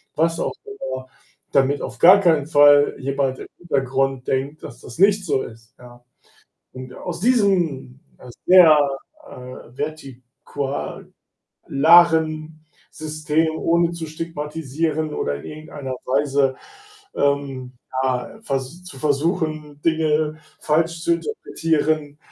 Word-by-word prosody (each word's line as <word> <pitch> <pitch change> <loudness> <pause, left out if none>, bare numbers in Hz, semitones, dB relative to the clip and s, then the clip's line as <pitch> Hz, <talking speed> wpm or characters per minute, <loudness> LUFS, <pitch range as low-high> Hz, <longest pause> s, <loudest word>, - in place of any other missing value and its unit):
was 165 +2 +1
auch - - -2
immer, 130 - -6 0.4
damit 140 +1 +2
auf - - -7
gar 185 +4 +8
keinen 160 -7 +2
Fall 145 -2 +5
jemand 135 -1 -2
im - - -9
Hintergrund 135 -4 -1
denkt, 140 +3 -2
dass - - -10
das 120 - -11
nicht 200 +1 +4
so 140 -5 0
ist, 115 0 -13
ja 120 0 -15 0.7
und 130 0 -9
aus 175 -1 -6
diesem, 180 - +1 0.2
äh, 125 - -12 0.2
sehr, 175 -4 +8 0.5
äh, 125 -1 -11
vertikularen 140 -1 -7 1.6
System, 155 +1 -1
ohne 170 +1 +2
zu 170 -1 -6
stigmatisieren 155 -1 -3
oder 70 - -2
in 70 - -9
irgendeiner 150 -3 -7
Weise, 135 0 +1 0.6
ähm, 140 -3 -1 0.3
ja, 130 - -2
vers 135 - -4
zu 180 -7 -11
versuchen, 155 0 -1
Dinge 155 -1 +1 0.2
falsch 165 +2 0
zu 170 - +3
interpretieren, 155 - -2
150 Hz, 115 wpm, -21 LUFS, 135-165 Hz, 1.6 s, gar